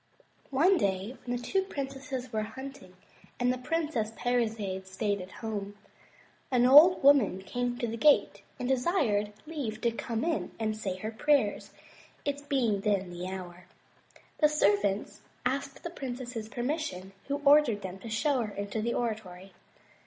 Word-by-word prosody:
One 340 Hz, +8 st, +4 dB
day 195 Hz, +5 st, -1 dB
when 245 Hz, 0 st, -2 dB
the 240 Hz, -, -9 dB
two 385 Hz, +10 st, +1 dB
princes 270 Hz, -6 st, -5 dB
were 215 Hz, -, +1 dB
hunting, 260 Hz, -3 st, -8 dB, 0.4 s
and 245 Hz, 0 st, +2 dB
the -, -, -4 dB
Princess 300 Hz, -5 st, -1 dB
Parizade 220 Hz, -6 st, -1 dB
stayed 200 Hz, +1 st, -1 dB
at 180 Hz, -, -9 dB, 0.2 s
home, 205 Hz, -2 st, -4 dB, 0.7 s
an 250 Hz, -2 st, +3 dB
old 300 Hz, +8 st, +8 dB
woman 265 Hz, -9 st, +5 dB
came 245 Hz, +4 st, -2 dB
to 245 Hz, -, -1 dB
the 230 Hz, 0 st, -4 dB
gate 205 Hz, -7 st, +4 dB, 0.2 s
and 250 Hz, -, -2 dB
desired 250 Hz, -, +1 dB
leave 275 Hz, -9 st, -4 dB
to 235 Hz, -, +2 dB
come 230 Hz, 0 st, -3 dB
in 330 Hz, -1 st, -1 dB
and 215 Hz, -1 st, -1 dB
say 200 Hz, -4 st, -3 dB
her 215 Hz, +4 st, -4 dB
prayers, 230 Hz, -2 st, +1 dB, 0.6 s
it 285 Hz, 0 st, -3 dB
being 235 Hz, -8 st, +1 dB
then 195 Hz, -3 st, 0 dB
the 175 Hz, +1 st, -5 dB
hour. 180 Hz, -1 st, -8 dB, 0.7 s
The 300 Hz, -, +5 dB
servants 205 Hz, -7 st, +1 dB, 0.2 s
asked 275 Hz, +2 st, -2 dB
the 340 Hz, -, -5 dB
princess's 245 Hz, -6 st, -6 dB
permission, 245 Hz, -, -3 dB, 0.2 s
who 280 Hz, -, 0 dB
ordered 280 Hz, -8 st, +5 dB
them 190 Hz, 0 st, -6 dB
to 225 Hz, -, -8 dB
show 255 Hz, +4 st, +1 dB
her 210 Hz, -3 st, -5 dB
into 200 Hz, +2 st, -3 dB
the 235 Hz, +2 st, -1 dB
oratory. 195 Hz, -5 st, -4 dB
235 Hz, 155 wpm, -30 LUFS, 205-275 Hz, 0.7 s, old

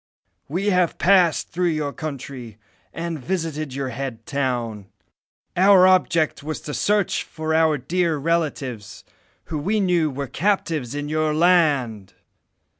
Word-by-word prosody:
We 195 Hz, +7 st, 0 dB
have 180 Hz, -2 st, +1 dB
passed 180 Hz, -3 st, +3 dB
through 180 Hz, +1 st, 0 dB
your 150 Hz, -3 st, -2 dB
country, 130 Hz, -7 st, -7 dB, 0.3 s
and 165 Hz, -1 st, -4 dB
visited 155 Hz, -6 st, -3 dB
your 135 Hz, -1 st, -3 dB
head 125 Hz, -1 st, -6 dB
town. 120 Hz, -8 st, -2 dB, 0.7 s
Our 190 Hz, 0 st, +6 dB
object 170 Hz, -5 st, +2 dB
was 155 Hz, +2 st, -4 dB
to 150 Hz, -, -6 dB
search 205 Hz, +2 st, +1 dB
for 160 Hz, 0 st, -4 dB
our 160 Hz, -1 st, +3 dB
dear 165 Hz, +4 st, 0 dB
relatives, 135 Hz, -, -2 dB, 0.5 s
who 155 Hz, -, -1 dB
we 205 Hz, +9 st, 0 dB
knew 175 Hz, -5 st, +2 dB
were 140 Hz, 0 st, -4 dB
captives 155 Hz, -, -1 dB
in 145 Hz, 0 st, -3 dB
your 155 Hz, 0 st, 0 dB
land. 145 Hz, -, +2 dB
155 Hz, 130 wpm, -22 LUFS, 135-175 Hz, 0.7 s, Our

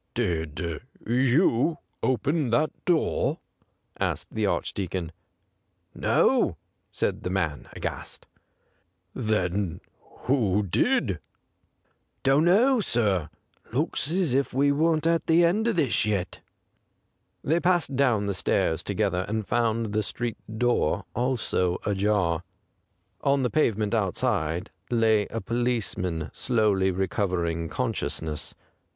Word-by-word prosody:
' -, -, -48 dB
Did 85 Hz, -6 st, -2 dB, 0.2 s
you 130 Hz, -, +3 dB, 0.2 s
open 145 Hz, +2 st, +1 dB
that 150 Hz, +7 st, +2 dB
door 170 Hz, -3 st, +1 dB, 0.3 s
}' -, -, -32 dB
asked -, -, -2 dB
the -, -, 0 dB
Archdeacon. 90 Hz, -3 st, -2 dB, 0.5 s
' -, -, -47 dB
No/ -, -, +2 dB, 0.3 s
said -, -, -1 dB
the -, -, -3 dB
man, 85 Hz, -6 st, -2 dB
aghast. -, -, -6 dB, 0.5 s
' 90 Hz, -, -45 dB, 0.2 s
Then 100 Hz, -6 st, -1 dB, 0.4 s
who 105 Hz, -7 st, +2 dB
did 95 Hz, -, +1 dB, 0.3 s
?' -, -, -46 dB
' -, -, -47 dB
Don't 135 Hz, +4 st, +4 dB
know, 235 Hz, +9 st, +5 dB
sir. 105 Hz, -, +1 dB, 0.4 s
Looks 140 Hz, -, 0 dB
as 175 Hz, -5 st, +1 dB
if 135 Hz, -1 st, 0 dB
we 140 Hz, +1 st, +4 dB
weren't 155 Hz, +2 st, +2 dB
at 165 Hz, 0 st, +1 dB
the 170 Hz, +1 st, +5 dB
end 210 Hz, +7 st, +2 dB
of 230 Hz, -, +1 dB
this 140 Hz, -9 st, +2 dB
yet.' 100 Hz, -4 st, -2 dB, 1.0 s
They 160 Hz, +4 st, +2 dB
passed 175 Hz, -6 st, +1 dB
down 125 Hz, -6 st, +2 dB
the 100 Hz, -, -1 dB
stairs 85 Hz, -3 st, +1 dB
to 100 Hz, -, -3 dB
gether, 95 Hz, -3 st, +1 dB
and 110 Hz, 0 st, -2 dB
found 115 Hz, -2 st, 0 dB
the 110 Hz, -, +2 dB
street 120 Hz, +2 st, -3 dB, 0.2 s
door 120 Hz, -9 st, +1 dB
also 120 Hz, -8 st, 0 dB
ajar. 100 Hz, -4 st, +1 dB, 0.8 s
On 140 Hz, -1 st, +2 dB
the 125 Hz, -, 0 dB
pavement 110 Hz, -8 st, +1 dB
outside 95 Hz, -5 st, 0 dB, 0.2 s
lay 110 Hz, -3 st, +3 dB
a 115 Hz, -, -4 dB
policeman 110 Hz, -10 st, -2 dB
slowly 105 Hz, -6 st, +2 dB
recovering 90 Hz, -3 st, -1 dB
consciousness. 80 Hz, 0 st, -3 dB
110 Hz, 125 wpm, -26 LUFS, 95-135 Hz, 1.0 s, know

